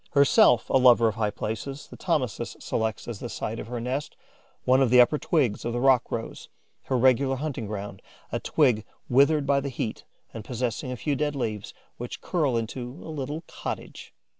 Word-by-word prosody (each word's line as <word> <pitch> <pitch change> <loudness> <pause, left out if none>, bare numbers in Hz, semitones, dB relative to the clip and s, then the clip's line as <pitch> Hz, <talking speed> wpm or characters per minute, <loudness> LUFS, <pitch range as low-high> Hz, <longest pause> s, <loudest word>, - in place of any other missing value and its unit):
Herself 140 -4 +5
a - - +5
lover 120 -3 +6
of - - -4
high 105 -1 0
places, 115 +7 -5
the - - -12
Thomisus 130 - -2
selects 110 -1 -2
as 115 -4 -5
the 120 - -6
site 115 0 -4
of - - -7
her 120 0 -4
nest 130 +5 -3 0.5
one 130 +1 +4
of 130 - +3
the 125 +1 +6
upper 135 +5 +5
twigs 130 -11 +1
of 120 - -2
the 120 - -1
rock 130 -1 +3
rose, 115 - -5 0.4
her 130 - 0
regular 130 +2 +3
hunting 135 -5 -4
ground, 100 -2 -6 0.3
a - - -1
twig 110 -4 +2 0.3
withered 140 +3 +4
by 140 0 +3
the 140 0 -3
heat 115 -3 -4 0.3
and 110 - -7
possessing 125 +2 -3
a 125 - -4
few 145 +4 -1
dead 145 +1 -1
leaves, 110 -6 -4 0.2
which 120 0 -6
curl 150 -9 0
into 120 +2 -4 0.2
a 160 - -6
little 150 +3 -4
cottage. - - -7
125 Hz, 190 wpm, -26 LUFS, 115-140 Hz, 0.5 s, lover